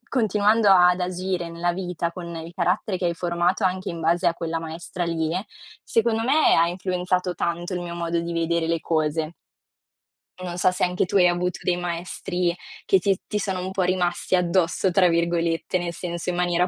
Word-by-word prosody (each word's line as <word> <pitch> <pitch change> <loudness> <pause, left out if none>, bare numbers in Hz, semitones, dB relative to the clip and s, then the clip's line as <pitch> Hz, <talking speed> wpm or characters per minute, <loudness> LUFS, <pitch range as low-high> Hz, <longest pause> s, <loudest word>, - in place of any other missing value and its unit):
continuando 215 -2 +3
ad 180 -1 +6
agire 180 -1 -2
nella 175 +1 -1
vita 175 -2 -3
con 170 -1 -7
il 165 +1 -7
carattere 185 +1 0
che 180 - 0
hai 170 - 0
formato 175 +3 0
anche 185 0 0
in 170 - -6
base 170 +2 +2
a 170 - -1
quella 165 -1 -3
maestra 170 +2 -5
lì, 160 -1 -1 0.5
secondo 225 -1 +1
me 285 +6 +4
ha 165 +1 +4
influenzato 180 0 -1
tanto 175 +2 -2
il 180 - -2
mio 170 -1 -5
modo 170 0 -1
di 170 0 -4
vedere 165 0 0
le 165 0 +1
cose. 155 0 -1 1.1
Non 175 -1 -5
so 180 +1 +3
se 180 - -2
anche 180 +1 +1
tu 195 - +1
hai 180 -1 +6
avuto 180 +1 -1
dei 180 -1 0
maestri 175 0 -2 0.3
che 190 - +5
ti 195 +1 +2
ti 210 - -2
sono 190 -2 -2
un 190 - -3
po' 190 -1 -1
"rimasti 180 0 0
addosso" 180 +1 +1
tra 180 0 +4
virgolette, 170 +1 0
nel 175 -1 -3
senso 175 0 -4
in - - -4
maniera 175 0 +1
175 Hz, 190 wpm, -24 LUFS, 170-185 Hz, 1.1 s, ad